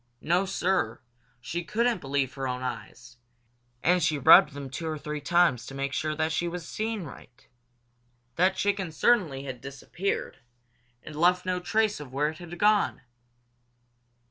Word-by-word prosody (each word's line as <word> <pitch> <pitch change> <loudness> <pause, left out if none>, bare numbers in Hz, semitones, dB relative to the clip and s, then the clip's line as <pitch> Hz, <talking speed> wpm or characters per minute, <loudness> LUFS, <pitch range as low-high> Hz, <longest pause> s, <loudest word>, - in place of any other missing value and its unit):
No, 180 +4 +1
Sir, 180 - 0 0.4
she 170 +8 -4
couldn't 230 +1 0
believe 135 -1 -1
her 135 -1 -4
own 125 0 -3
eyes, 120 -1 -7 0.7
and 180 +1 +3
she 155 -2 +1
rubbed 140 +1 +7
them 140 -1 -7
two 135 +5 -5
or 155 -1 -3
three 150 0 -5
times 165 -5 +3
to 135 - -8
make 140 0 -3
sure 155 +1 -1
that 155 +1 0
she 175 +2 -1
was 170 -1 -6
seeing 220 -2 -3
right. 125 -3 -14 0.9
That 185 +2 +3
chicken 200 -3 -1
certainly 160 - +2
had 130 -3 -7
disappeared, 140 +8 -4 0.6
and 150 - -9
left 180 +3 +3
no 185 0 -1
trace 215 +2 0
of 145 -4 -9
where 145 +3 0
it 155 - -9
had 175 0 -9
gone. 210 +2 +2
160 Hz, 160 wpm, -27 LUFS, 140-180 Hz, 0.9 s, rubbed